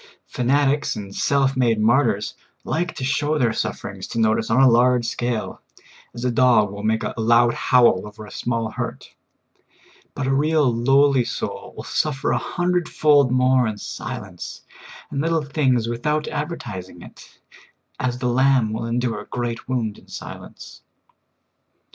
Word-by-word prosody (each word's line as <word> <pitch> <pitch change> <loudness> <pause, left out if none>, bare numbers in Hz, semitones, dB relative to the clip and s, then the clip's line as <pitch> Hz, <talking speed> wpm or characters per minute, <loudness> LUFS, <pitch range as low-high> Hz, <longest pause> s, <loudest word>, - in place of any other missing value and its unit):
Fanatics 140 +3 +1
and 100 -2 -8
self 135 -1 +1
made 120 -4 +2
martyrs 110 -2 +2 0.3
like 170 +2 -2
to - - -6
show 145 +3 0
their 120 -5 +1
sufferings - - -4
to 115 - -4
notice 110 0 +1
on 115 +3 +3
a 135 - +7
large 125 0 +4
scale, 120 -1 -3 0.5
as 120 +1 -5
a 125 - +1
dog 120 -4 +4
will 100 0 -7
make 110 +2 0
a - - -3
loud 120 +1 +4
howl 120 -6 +3
over 105 +1 -11
a - - -13
small 115 -2 -2
hurt; - - -6 1.0
but - - -3
a 135 - +1
real 150 +1 +2
lowly 135 +2 +3
soul - - -5
will - - -6
suffer 145 -3 -1
a - - +2
hundred 175 -1 -1
fold 145 -4 +4
more 130 -1 +3
in 110 -1 -4
silence - - -7 0.5
and 140 - -1
little 165 0 0
things 135 -5 +1
without 150 +6 -1
advertising 100 - -6
it, - - -15 0.6
as 125 -1 -1
the 125 0 -2
lamb 130 -3 +3
will 115 +1 -3
endure 120 -1 -1
a - - -14
great 120 0 -4
wound 115 -5 -2
in - - -22
silence. - - -10
125 Hz, 155 wpm, -22 LUFS, 115-140 Hz, 1.0 s, a